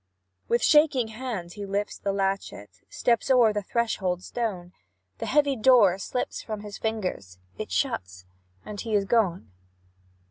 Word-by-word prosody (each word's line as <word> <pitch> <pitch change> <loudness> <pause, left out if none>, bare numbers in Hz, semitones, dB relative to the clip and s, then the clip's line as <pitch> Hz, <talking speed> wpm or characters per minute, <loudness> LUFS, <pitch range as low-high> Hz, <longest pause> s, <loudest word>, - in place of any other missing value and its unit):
With 235 0 +1
shaking 295 -6 +4
hand, 220 -7 -5
he 205 - -7
lifts 200 +1 -2
the 200 - -1
latchet, 195 - -2 0.2
Steps 235 0 0
o'er 240 -5 +5
the 210 - -1
threshold 190 -5 -1
stone; 190 -7 -4 0.5
The - - -4
heavy 285 -1 +3
door 215 -6 +5
slips 250 - -3
from 215 -2 -6
his 205 -1 -8
fingers 185 - -3 0.2
It - - -5
shuts, 95 0 -2 0.4
and 205 -2 -6
he 225 -2 -2
is 200 -1 +2
gone. 190 - +1
205 Hz, 145 wpm, -26 LUFS, 180-235 Hz, 0.5 s, o'er